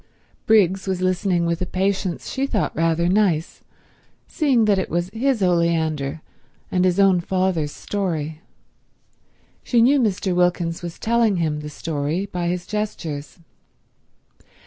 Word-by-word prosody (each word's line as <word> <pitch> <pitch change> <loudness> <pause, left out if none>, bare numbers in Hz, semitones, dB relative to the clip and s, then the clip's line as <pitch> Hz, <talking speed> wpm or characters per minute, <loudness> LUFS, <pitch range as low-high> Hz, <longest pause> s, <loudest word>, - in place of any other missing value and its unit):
Briggs 195 -3 +3
was 190 -2 -1
listening 185 -1 +1
with 170 0 -1
a - - 0
patience 190 -1 -1
she 270 +1 -1
thought 215 -7 -1
rather 165 +1 +1
nice, 180 -4 +1 0.7
seeing 270 -8 +2
that 205 -2 +3
it 190 - -3
was 175 +2 -2
his 240 -2 0
oleander 160 -4 0 0.5
and 180 0 +2
his 180 +1 +2
own 195 -2 +5
father's 180 -4 -1
story. 160 -5 -3 1.2
She 240 - +1
knew 265 +5 +5
Mr. 200 -5 0
Wilkins 175 -1 +1
was 170 -1 -7
telling 230 -2 +2
him 155 -3 -1
the 150 0 -7
story 150 +4 -3
by 180 -3 -3
his 175 0 -2
gestures. 160 -9 -4
180 Hz, 135 wpm, -22 LUFS, 165-200 Hz, 1.2 s, own